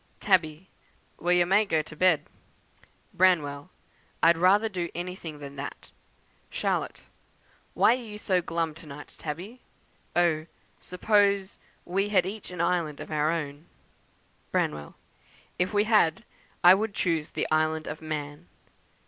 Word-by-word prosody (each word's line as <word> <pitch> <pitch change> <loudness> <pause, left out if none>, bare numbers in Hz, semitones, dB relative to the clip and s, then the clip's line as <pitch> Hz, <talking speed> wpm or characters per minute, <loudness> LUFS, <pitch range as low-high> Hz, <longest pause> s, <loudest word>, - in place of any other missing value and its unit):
"Tabby. 175 -3 +1 0.5
'Wha 175 - -2
ya 180 -1 +4
may 195 +4 +4
go 160 -7 0
t' 155 - -12
bed.' 180 -2 +3 0.9
"Branwell. 160 -5 +2 0.5
'I'd 170 +1 +7
rather 190 +6 +4
do 180 -5 -3
anything 175 -3 -6
than 140 -1 -10
that.' 140 - -7 0.6
"Charlotte. - - -2 0.7
'Why - - +5
are 255 - -3
you 215 -3 -7
so 185 -3 +1
glum 165 -1 -2
to 155 0 -13
night, 145 +1 -10
Tabby? 180 +11 -6 0.5
Oh! 165 -2 +2 0.3
suppose 200 +1 +1 0.3
we 195 +3 0
had 185 -4 +3
each 205 +2 -6
an 180 -2 -4
island 170 -4 0
of - - -8
our 155 0 +1
own.' 150 -1 -4 0.8
"Branwell. 75 -1 -2 0.6
'If 180 +1 +1
we 205 -1 +3
had 210 -7 +3 0.4
I 175 +1 +10
would 205 +1 -1
choose 165 -4 0
the - - -2
Island 155 0 +1
of 155 - -6
Man.' 145 - -5
170 Hz, 140 wpm, -27 LUFS, 155-190 Hz, 0.9 s, I